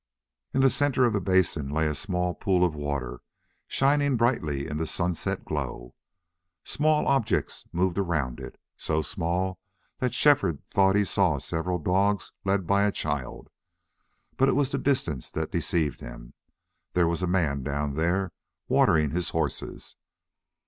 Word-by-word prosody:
In 135 - +1
the 135 -1 +5
center 140 -3 +2
of 120 - +2
the 100 - 0
basin 90 -6 +1
lay 80 +2 0
a 75 - 0
small 90 +3 -1
pool 90 0 +2
of 85 - -1
water 70 -5 -4 0.5
shining 140 -1 +2
brightly 80 - 0
in 75 -1 -4
the 80 +1 -2
sunset 85 +1 -2
glow. 65 -5 -4 0.7
Small 150 +1 +1
objects 135 -6 0
moved 90 +2 0
around 75 -10 -1
it, - - -9 0.2
so 80 0 -1
small 90 +4 -2 0.4
that 125 -2 -1
Shefford 140 - +3
thought 95 0 +4
he 105 0 +3
saw 90 -6 +2
several 85 +5 -2
dogs 95 +5 +1
led 95 -2 +1
by 100 +3 +3
a 105 - +2
child. 75 -8 -4 0.9
But 135 +1 +4
it - - +3
was 140 -1 +1
the 140 - -1
distance 85 - -1
that - - -4
deceived 80 -5 0
him. - - -10 0.6
There 90 -2 +3
was 85 +1 -1
a 90 - 0
man 80 -7 +1
down 70 +1 -2
there 85 +4 0 0.4
watering 75 -3 +3
his 85 +1 -1
horses. - - -4
90 Hz, 155 wpm, -27 LUFS, 75-100 Hz, 0.9 s, the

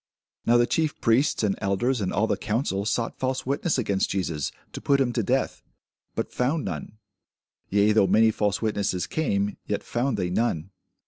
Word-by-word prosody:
Now 120 +1 +6
the 120 - +4
chief 155 +4 0
priests, 115 +2 +2
and 100 -2 +2
elders, 105 +6 0
and 95 - -1
all 105 - +2
the - - +1
council, 105 -3 -1
sought 115 +1 -1
false 130 0 -1
witness 140 +5 0
against 100 -6 0
Jesus, 85 -6 -2 0.2
to - - -6
put 140 -1 +3
him 125 -3 +1
to 120 - +1
death; 100 - 0 0.5
but - - -3
found 140 +5 0
none: 110 - -5 0.7
yea, 100 +2 +4
though 105 -2 +4
many 110 0 +5
false 105 0 -1
witnesses 100 -4 0
came, 105 -10 -1
yet - - -2
found 120 -1 -1
they 90 -2 -1
none. 95 -4 -1
110 Hz, 180 wpm, -25 LUFS, 100-125 Hz, 0.7 s, Now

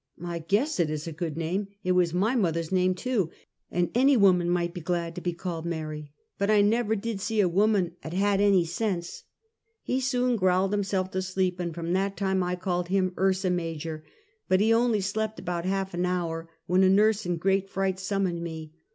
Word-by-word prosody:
"I 170 -1 -3
guess 205 - 0
it 165 -3 +2
is 155 0 -3
a 165 - -5
good 155 -1 -4
name! 180 +5 -2 0.2
It 185 - +1
was 180 -2 +3
my 200 +9 +1
mother's 165 -7 0
name 185 0 +2
too, 210 -4 -1 0.4
and 175 0 0
any 265 +2 +4
woman 180 -4 +4
might 175 -1 0
be 175 - -6
glad 170 0 -2
to 180 - -7
be 175 - -1
called 170 -1 -5
Mary. 155 -3 -5 0.3
Bat 200 +1 +1
I 210 -1 +5
never 220 +1 +2
did 220 -1 -4
see 220 +1 -1
a 195 - +5
woman 195 0 +2
'at 160 - -7
had 200 +1 +2
any 195 -4 +4
sense 175 -1 -3 0.3
!" 450 0 -51
He 255 - 0
soon 250 -2 +1
growled 185 0 +2
himself 195 -2 -1
to 190 - -1
sleep, 185 -1 -1
and 175 -1 -2
from 170 0 -2
that 195 +1 0
time 190 -1 +1
I 180 0 -1
called 180 -1 -2
him 185 -1 +1
" - - -12
Ursa 190 -1 +2
Major;" 165 -2 -3 0.5
but 185 - +4
he 220 +2 +4
only 230 -2 +2
slept 215 +3 -2
about 175 -2 -3
half 195 0 -1
an 175 +1 0
hour, 165 -2 -2 0.2
when 180 +2 +3
a 190 - +5
nurse 210 0 +3
in 175 -1 0
great 195 +3 +1
fright 190 -1 -1
sum 195 +1 -1
moned 170 -2 -2
me. 160 -2 -7
185 Hz, 215 wpm, -27 LUFS, 170-200 Hz, 0.5 s, I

